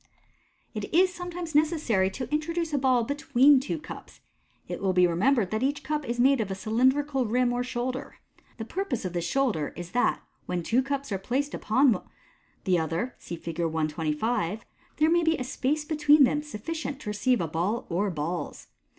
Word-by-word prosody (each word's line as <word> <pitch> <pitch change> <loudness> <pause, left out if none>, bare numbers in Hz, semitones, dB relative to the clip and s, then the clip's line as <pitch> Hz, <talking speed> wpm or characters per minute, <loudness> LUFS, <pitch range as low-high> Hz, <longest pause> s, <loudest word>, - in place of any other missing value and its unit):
It 210 -3 -5
is 365 +2 +4
sometimes 355 -2 -6
necessary 295 - +2
to 235 +6 -5
introduce 330 +1 -1
a 285 - +2
ball 255 -2 +3
between 280 +1 +4
two 290 +5 -3
cups. 310 - -10 0.5
It - - -5
will 190 -1 +1
be 180 0 +5
remembered 195 +4 +2
that 215 +1 -1
each 280 +2 -1
cup 300 -4 -3
is 240 0 -2
made 270 +2 +4
with 215 -3 -1
a 190 - -3
cylindrical 260 +6 +1
rim 245 +2 +2
or 245 0 -1
shoulder. 255 +1 -4 0.4
The 225 - -5
purpose 320 - -3
of 180 - -3
this 170 -1 -2
sh.mider 235 - 0
is 175 0 -7
that, 245 - +1 0.2
when 175 -1 -2
two 235 +9 +2
cups 275 -1 -3
au 195 - -1
placed 270 +9 -2
one - - -4
upon 245 +2 +2 0.5
the 185 -3 +2
other 165 +10 -2
(see 170 - -6
Fig. 165 0 -7
125), 165 +6 -1 0.3
there 305 - +4
may 345 0 +4
be 325 -1 +2
a 255 - -3
space 285 +4 -1
between 300 -1 +5
them 295 +3 +2
suffl 300 0 -6
ient 315 -4 -4
to 210 - -5
receive 245 +4 +1
a 165 - -1
ball 180 +9 -1
or 190 +4 0
balls. 170 +1 -4
250 Hz, 190 wpm, -27 LUFS, 190-290 Hz, 0.5 s, be